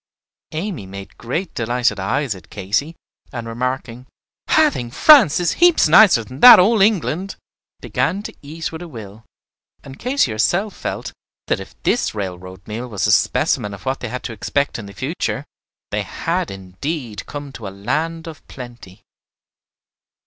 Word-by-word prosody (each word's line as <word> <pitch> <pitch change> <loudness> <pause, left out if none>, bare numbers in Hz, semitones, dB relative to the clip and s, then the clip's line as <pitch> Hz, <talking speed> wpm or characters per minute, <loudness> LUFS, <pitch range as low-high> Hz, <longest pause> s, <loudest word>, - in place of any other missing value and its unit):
Amy 160 - -4
made 100 0 -10
great 165 +10 -3
delighted 120 -2 0
eyes 115 +6 -1
at 90 -4 -14
Katy, 110 - -2 0.4
and 120 -3 -6
remarking, 125 +1 -4 0.4
"I 310 -1 +4
think 120 - -6
France 265 - +7
is 175 - +1
heaps 350 - +6
nicer 175 - +6
than 130 +4 -11
that 250 +8 +11
old 210 +3 +4
England," 195 -2 +1 0.5
began 200 +2 -1
to - - -7
eat 160 +3 -6
with 160 +1 -8
a 175 - -7
will; 110 -6 -10 0.6
and 135 -1 -11
Katy 255 - +1
herself 175 - 0
felt - - -5 0.3
that - - 0
if - - -11
this 240 - 0
railroad 95 -2 -6
meal 115 +4 -5
was 105 -5 -2
a 105 - +3
specimen 100 0 +1
of 100 - -16
what 130 +1 -1
they 125 - -5
had 125 +2 -5
to 115 - -5
expect 140 +5 -1
in 105 - -8
the 100 - -11
future, 95 - -3 0.5
they - - 0
had - - -2
indeed 105 - -6
come 145 -1 -7
to 115 -6 -8
a - - -4
land 155 +12 -3
of 160 -2 -10
plenty. 120 -6 -11
125 Hz, 165 wpm, -20 LUFS, 105-165 Hz, 0.6 s, that